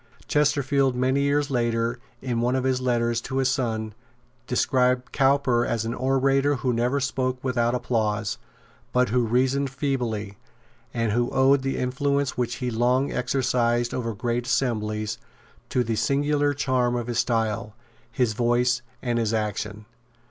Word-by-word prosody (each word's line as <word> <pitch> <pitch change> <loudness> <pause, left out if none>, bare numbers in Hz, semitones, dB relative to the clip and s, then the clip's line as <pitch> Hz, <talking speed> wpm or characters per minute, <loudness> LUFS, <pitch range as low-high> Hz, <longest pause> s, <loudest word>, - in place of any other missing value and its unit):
Chesterfield 140 -3 +2
many 130 +2 +1
years 140 +1 +1
later, 120 -1 0 0.2
in 120 -3 -1
one 125 +2 +1
of 130 - 0
his 130 -1 +1
letters 120 -2 +1
to 130 - -4
his 135 -1 +2
son, 110 -5 -2 0.5
described 125 0 +1
Cowper 135 -3 +3
as 115 -2 -1
an 115 - -2
orator 135 +2 +2
who 125 -1 -1
never 120 +4 +1
spoke 130 -2 -1
without 120 -2 +1
applause, 110 -4 -1 0.5
but 125 0 +3
who 125 +2 +2
reasoned 130 +4 +1
feebly, 120 -7 -3 0.5
and 115 -2 -1
who 120 +3 +1
owed 135 +1 +4
the 135 0 -2
influence 140 +2 0
which 120 -1 -1
he 125 -1 -3
long 125 +4 +1
exercised 120 -2 0
over 115 -3 -3
great 120 +2 -2
assemblies 110 -4 -1 0.5
to 125 -2 +1
the 115 -1 -1
singular 145 +3 +1
charm 130 -3 +1
of 120 -1 -2
his 120 0 -2
style, 110 -2 -1 0.4
his 115 -1 +1
voice 120 +1 +2 0.2
and 120 -2 0
his 115 -1 0
action. 105 0 -3
125 Hz, 150 wpm, -25 LUFS, 115-135 Hz, 0.5 s, owed